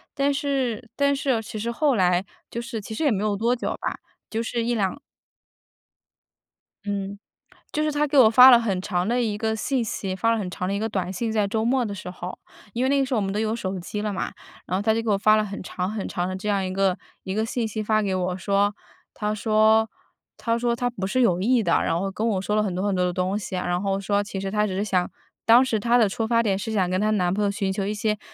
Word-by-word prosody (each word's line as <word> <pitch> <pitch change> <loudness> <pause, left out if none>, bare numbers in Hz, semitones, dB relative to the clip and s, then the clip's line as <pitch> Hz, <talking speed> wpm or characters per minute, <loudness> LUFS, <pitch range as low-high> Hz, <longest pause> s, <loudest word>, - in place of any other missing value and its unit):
但 280 0 +2
是 270 -6 -2
但 280 0 +2
是 275 0 -3
哦， 225 - +1
其 215 0 -7
实 230 - -2
后 280 +1 +2
来 180 -1 +3 0.3
就 235 - -4
是 235 -1 -5
其 215 +1 -8
实 320 - -2
也 285 - +3
没 200 -1 0
有 210 -1 +1
多 230 +4 +1
久 - - -3
吧， - - -3 0.3
就 225 - -2
是 230 0 -2
1-2 230 +1 -1 1.9
嗯， 200 0 -3 0.5
就 305 - -1
是 305 - +1
她 295 0 +1
给 285 0 0
我 235 -4 +8
发 250 +3 +9
了 240 - +8
很 200 -5 -1
长 180 -2 -1
的 240 +2 +1
一 215 -3 -1
个 220 0 -1
信 250 +2 -1
息， 195 -3 -3
发 230 +4 +1
了 230 - +2
很 190 -4 -3
长 180 - -3
的 195 - -1
一 - - 0
个 220 - -1
短 190 -4 -2
信， 220 +4 -2
在 210 -2 +1
周 220 +2 -1
末 255 +1 +2
的 205 -3 -3
时 180 - -7
候。 180 0 -7 0.4
因 245 +2 -1
为 260 - +2
那 280 0 +3
个 270 - +2
时 260 - -4
候 - - +2
我 - - 0
们 195 0 -2
都 210 - -1
有 220 +1 0
手 190 -4 -4
机 205 +4 -5
了 210 -1 -2
嘛， 185 - -3 0.4
然 185 - 0
后 - - -1
她 220 +1 +2
就 225 - 0
给 225 - -3
我 200 - +3
发 215 +1 +5
了 215 - +2
很 200 -1 -6
长 185 +1 -3
很 215 -2 -4
长 175 0 -2
的 185 - -3
这 190 +3 -6
样 200 -1 +1
一 185 - -3
个 190 -1 +1 0.3
一 190 - -4
个 220 +1 0
信 230 -1 -2
息 215 +1 -4
发 215 0 +2
给 195 -2 -1
我 185 0 -1
说， 200 +2 +1 0.4
她 210 0 -1
说 220 +1 +3 0.5
她 230 0 0
说 235 0 0
她 245 +1 -1
不 190 -5 -4
是 255 +6 +1
有 180 -6 +3
意 240 +3 +3
的， 170 - +1
然 165 - 0
后 195 +1 -2
跟 220 +4 -2
我 195 -4 0
说 210 +2 -1
了 215 - +3
很 195 -4 -2
多 185 +2 -1
很 205 - +1
多 180 - +1
的 180 - +1
东 185 +3 -1
西 190 -2 -5
啊， 180 - -2
然 175 +1 0
后 195 -1 0
说 200 +1 +1
其 195 -1 -6
实 195 0 -3
她 210 0 +1
只 185 - -4
是 200 - 0
想 185 -4 0 0.4
当 240 +3 +7
时 225 -4 0
她 240 +3 +3
的 225 -3 +5
出 220 +3 -2
发 230 0 +3
点 195 -3 +1
是 220 +2 -4
想 190 -4 +1
跟 185 +2 +1
她 215 - +2
男 180 -3 +1
朋 210 +1 0
友 200 - +2
寻 195 -1 -1
求 195 0 -2
一 210 - -1
些 215 -1 -1
210 Hz, 300 characters per minute, -24 LUFS, 195-230 Hz, 1.9 s, 发